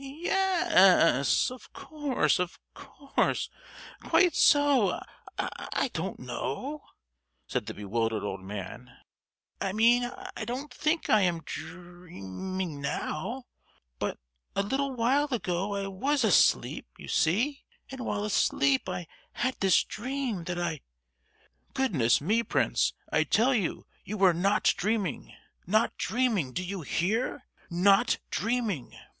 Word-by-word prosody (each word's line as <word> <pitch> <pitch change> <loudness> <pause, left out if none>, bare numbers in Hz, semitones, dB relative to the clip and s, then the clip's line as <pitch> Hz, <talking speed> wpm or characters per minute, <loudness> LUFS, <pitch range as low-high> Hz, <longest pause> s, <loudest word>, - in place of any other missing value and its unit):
"Ye—yes, 320 - +3
of 255 - -11
course, 295 - 0
of 180 -1 -2 0.2
course—quite 315 +4 -1
so. 285 - +4 0.4
I - - -2
don't - - -3
know," 290 +3 -4 0.6
said - - -3
the - - -5
bewildered 110 +2 -1
old 95 -2 -4
man. 105 +6 -8 0.6
"I 195 -1 -1
mean, 235 +3 +4 0.3
I - - -4
don't 260 +5 -5
think 310 +2 0
I 215 - +5
am 175 -3 0
drea—ming 175 - -6
now; 160 - -3 0.6
but, - - -2 0.4
a 200 - +1
little 270 +6 -1
while 260 +4 +2
ago 195 -4 -1
I 200 0 -2
was 260 +9 0
asleep, 205 - +3
you - - -11
see; 225 - +1 0.3
and 265 -1 -6
while 205 -2 -2
asleep 140 -8 +2
I 180 -1 -4 0.3
had 255 +1 -2
this 190 -2 +4
dream, 245 -6 -4
that 180 0 -3
I——" 165 -5 -2 0.9
"Goodness 170 - +2
me, 210 +10 +1
Prince, 235 - +1 0.2
I - - +3
tell 250 +5 +3
you 205 -8 -1 0.2
you 215 - -5
were 190 -3 +5
not 195 +5 +1
dreaming. 200 -4 -2 0.3
Not 215 +5 +2
dreaming, 220 - 0
do 180 - -2
you 190 0 -4
hear? 200 - -1 0.2
Not 190 +3 +4
dreaming! 220 - -2
200 Hz, 120 wpm, -28 LUFS, 175-255 Hz, 0.9 s, I